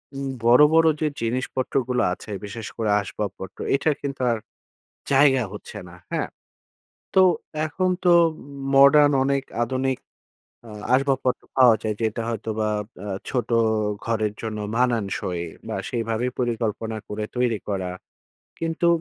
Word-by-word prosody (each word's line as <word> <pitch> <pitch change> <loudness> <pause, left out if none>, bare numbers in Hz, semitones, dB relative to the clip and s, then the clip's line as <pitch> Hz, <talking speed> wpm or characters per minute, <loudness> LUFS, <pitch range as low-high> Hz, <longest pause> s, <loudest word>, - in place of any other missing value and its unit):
উম 135 0 -3 0.2
বড়, 120 +4 +7
বড়, 165 0 +6
যে 155 - +2
জিনিসপত্রগুলো 125 +1 -1
আছে 105 - -9
বিশেষ 110 +2 -7
করে 110 -2 0
আসবাবপত্র। 100 -1 -6 0.2
এটার 145 +2 +1
কিন্তু 140 -2 -4
আর 115 - 0 0.7
জায়গা 135 -2 +5
হচ্ছে 105 0 -9
না, 85 - -13 0.2
হ্যাঁ? - - -1 0.9
তো 190 - +7 0.4
এখন 185 +4 0 0.2
তো 175 - +6 0.6
মডার্ন 145 +2 +7
অনেক 140 0 +1 0.2
আধুনিক 130 +2 -1 0.7
আ - - -10 0.2
আসবাবপত্র 135 -1 +1
পাওয়া 125 -3 +7
যায় 110 -1 -1
যেটা 110 +1 -1
হয়তোবা 110 -1 -2 0.4
আ - - -5 0.2
ছোট 120 -3 -1 0.6
ঘরের 110 -2 0
জন্য 110 -1 -4 0.2
মানানসই 105 -8 0 0.2
বা - - -3
সেইভাবে 115 +1 -1
পরিকল্পনা 115 -2 -2
করে 105 +1 -3
তৈরি 120 -3 +1
করা। 95 -3 -2 0.7
কিন্তু 165 +1 0
120 Hz, 125 wpm, -24 LUFS, 110-135 Hz, 0.9 s, বড়